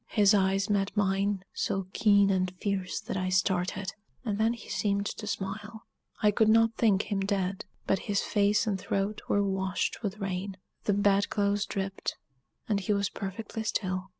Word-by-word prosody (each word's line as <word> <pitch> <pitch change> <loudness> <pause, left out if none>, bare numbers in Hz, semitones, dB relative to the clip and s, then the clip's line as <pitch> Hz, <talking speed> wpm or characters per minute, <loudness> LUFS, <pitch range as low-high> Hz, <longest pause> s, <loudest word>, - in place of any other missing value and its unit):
His 205 -1 +4
eyes 195 0 +2
met 205 -1 0
mine, 195 -1 +1
so 195 -1 -1
keen 200 -2 +4
and 185 -1 +1
fierce 195 -3 -1
that - - -5
I 185 0 -1
started; 185 0 0 0.3
and 210 -2 -1
then 225 +2 +3
he 235 - -11
seemed 200 -1 0
to 210 +1 -5
smile. 210 +3 -5 0.4
I 210 - +6
could 215 +1 +3
not 225 +1 +5
think 210 -4 +3
him 200 - +1
dead 195 -1 -1 0.2
but 195 - +2
his 200 -1 +2
face 205 +1 +2
and 200 -3 -1
throat 195 +3 -2
were 205 - +3
washed 190 0 -1
with 205 -2 -3
rain; 195 -1 -3 0.3
the 205 - +3
bed 200 0 +3
clothes 205 +1 +1
dripped, 195 -1 -3 0.5
and 205 -2 +1
he 200 +2 0
was 200 -1 +1
perfectly 205 +3 -5
still. 185 -3 -2
200 Hz, 175 wpm, -29 LUFS, 195-210 Hz, 0.5 s, I